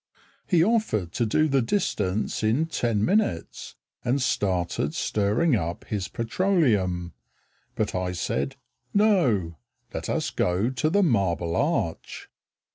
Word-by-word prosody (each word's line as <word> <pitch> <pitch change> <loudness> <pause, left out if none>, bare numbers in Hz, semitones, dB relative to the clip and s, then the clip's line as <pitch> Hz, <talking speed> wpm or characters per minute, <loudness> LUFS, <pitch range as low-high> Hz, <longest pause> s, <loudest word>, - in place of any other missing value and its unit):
He 170 -4 +4
offered 185 - +1
to 120 +3 0
do 155 +8 +2
the 135 -2 +2
distance 110 - -1
in 115 +9 +2
ten 115 -9 0
minutes 195 - -1 0.3
And 125 +3 +1
started 90 - 0
stirring 110 +9 +1
up 85 -4 -3
his 100 -4 -3
petroleum, 110 - 0 0.6
But - - -1
I 90 0 -2
said 70 -5 -2 0.4
"No. 130 - +2 0.4
Let - - -4
us - - -1
go 95 +7 0
to 130 +4 0
the 200 +4 +3
Marble 90 - +1
Arch." - - -2
110 Hz, 120 wpm, -25 LUFS, -, 0.6 s, He